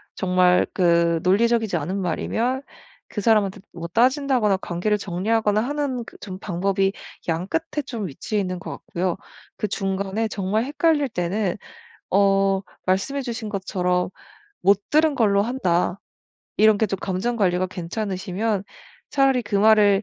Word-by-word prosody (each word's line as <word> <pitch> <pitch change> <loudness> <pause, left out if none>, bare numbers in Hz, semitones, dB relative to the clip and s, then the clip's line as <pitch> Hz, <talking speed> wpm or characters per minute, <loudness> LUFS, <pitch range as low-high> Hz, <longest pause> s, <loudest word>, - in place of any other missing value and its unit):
정말 180 -1 +3
그 170 -2 +3
논리적이지 225 +3 +2
않은 190 +2 -3
말이면 235 +9 -1 0.5
그 205 - -4
사람한테 205 -2 +2
뭐 170 0 -6
따진다거나 250 - +2
관계를 185 +3 -1
정리하거나 210 +3 0
하는 270 -1 -2
그 - - -13
좀 190 -2 -8
방법이 195 +1 0 0.4
양 165 +1 -1
끝에 320 +3 -2
좀 230 -6 -4
위치해 205 +8 -2
있는 185 -1 -3
것 - - -7
같고요. 175 0 -3 0.4
그 210 - -1
중간에 195 +2 -1
정말 205 +1 -1
헷갈릴 290 +1 +1
때는 185 0 -1 0.5
어 195 0 +3 0.2
말씀해 195 +10 0
주신 235 -4 -5
것처럼 180 -3 -1 0.5
"못 200 0 +4
들은 310 0 +4
걸로 205 -5 +3
한다." 195 -6 0 0.6
이런 215 -1 +5
게 220 - +2
좀 195 -1 -3
감정관리가 190 -2 0
괜찮으시면 190 +2 -3 0.5
차라리 270 -2 +3
그 205 -2 -2
말을 205 -1 +5
200 Hz, 295 characters per minute, -23 LUFS, 185-230 Hz, 0.6 s, 이런